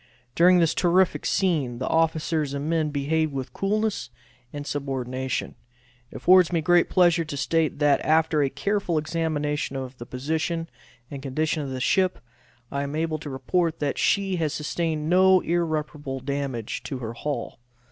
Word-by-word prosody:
During 180 +4 +5
this 165 -2 +3
terrific 180 +1 +2
scene 155 -11 0
the 130 - -3
officers 160 -2 0
and 140 +2 -3
men 160 -2 +1
behaved 150 +2 0
with 135 -2 -5
coolness 215 - -1 0.4
and 145 -1 -6
subordination. 130 -2 -3 0.6
It - - -16
affords 185 -1 +5
me 170 - +1
great 175 +2 +3
pleasure 175 -2 +4
to 145 -2 -5
state, 160 +3 0
that, 145 -1 +3
after 155 -1 +3
a 140 - +2
careful 180 +4 -1
examination 150 -3 -1
of 130 -1 -6
the 120 - -8
position 160 +5 -2 0.4
and 140 -2 -6
condition 155 +3 -1
of 140 - -4
the 130 -1 -4
ship, 185 +7 +2 0.5
I 140 - -2
am 140 +1 -4
enabled 155 -1 -1
to 150 - -6
report 160 +6 -1
that 145 -2 -2
she 195 -2 +1
has 155 -3 -1
sustained 155 0 -2
no 185 +1 +5
irreparable 155 -5 -2
damage 135 -4 -3
to 135 - -4
her 115 -2 -5
hull. 145 +1 -4
155 Hz, 160 wpm, -25 LUFS, 140-170 Hz, 0.6 s, During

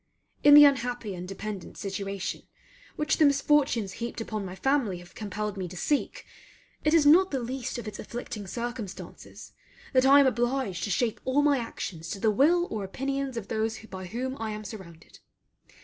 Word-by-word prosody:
In 290 0 +9
the 295 0 +11
unhappy 245 -6 +1
and 180 0 -7
dependent 195 0 -7
situation 195 -1 -4 0.5
which 305 0 0
the 310 - +5
misfortunes 280 -7 +2
heaped 235 0 -4
upon 215 -2 -4
my 185 -1 -7
family 240 -3 +1
have 175 0 -14
compelled 210 0 -4
me 185 -2 -3
to 180 +1 -10
seek, 290 - -1 0.6
it 305 +2 +3
is 315 -3 +5
not 360 +6 +6
the 270 - -1
least 255 +1 -4
of 235 - -6
its 210 - -7
afflicting 215 -3 -6
circumstances 235 -2 -7 0.4
that 260 0 +4
I 280 +1 +8
am 280 - +6
obliged 240 -5 0
to - - -4
shape 225 +4 0
all 270 +3 +2
my 285 -2 +3
actions 170 -8 -6
to 195 - -4
the 220 +2 +3
will 335 +10 +3
or 215 -2 -3
opinions 270 +5 -3
of 215 - -5
those 220 0 -1
by 190 -5 -9
whom 255 +7 -4
I 225 -1 -3
am 215 0 -5
surrounded. 190 -7 -11
230 Hz, 180 wpm, -27 LUFS, 200-270 Hz, 0.6 s, the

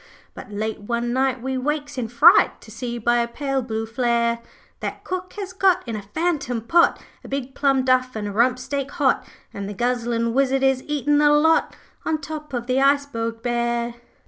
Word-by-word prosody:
'But - - -10
late 215 +1 -3
one 235 +3 -2
night 260 -1 0
we 265 0 -2
wakes 290 +2 -2
in 250 -3 -2
fright 235 +1 +5
To 220 - -14
see 240 +1 -5
by 240 +1 +2
a 235 - +1
pale 270 +2 -2
blue 225 -2 -3
flare, 235 0 0 0.4
That - - -5
cook 370 0 -5
has 390 -3 -6
got 370 -4 +2
in 230 - -3
a 210 - -4
phantom 275 - -2
pot 335 +10 +3 0.2
A - - -10
big 270 -1 -4
plum 270 -2 +2
duff 255 -1 +2
an' 215 -1 -3
a 205 - -3
rump 245 +4 +3
steak 275 +1 -3
hot, 290 -7 +2 0.3
And 200 0 -5
the 205 - -6
guzzlin' 235 0 0
wizard 270 0 +2
is 265 -1 +3
eatin' 295 0 +1
the 295 0 +5
lot, 315 +2 +3 0.3
On 315 -1 -1
top 305 +1 -7
of 240 -2 -3
the 255 +2 +1
iceberg 275 -5 +1
bare.' 235 -1 -1
255 Hz, 195 wpm, -22 LUFS, 235-285 Hz, 0.4 s, fright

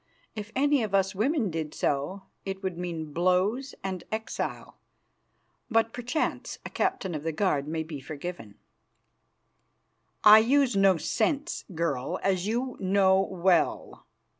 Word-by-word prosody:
If 215 0 -6
any 285 0 +3
of 210 -3 -1
us 195 0 +2
women 225 - 0
did 155 -2 -4
so, 145 +8 -1 0.2
it 195 0 -5
would 190 -2 -2
mean 165 -4 -5
blows 185 - +1
and 190 -2 -4
exile; 220 0 -4 0.9
but 225 -1 +2
perchance 250 +5 -2
a - - -6
captain 370 - -1
of 150 - -3
the 165 +2 -2
guard 150 -4 0
may 160 +1 -2
be 155 -2 -7
forgiven." 140 - -7 1.7
"I 215 +1 +10
use 255 +1 +3
no 195 -2 +5
scents, 270 - -1
girl, 145 -6 -1
as 190 -1 +1
you 245 +3 -2
know 190 0 +4
well. 185 -2 0
190 Hz, 135 wpm, -28 LUFS, 165-225 Hz, 1.7 s, I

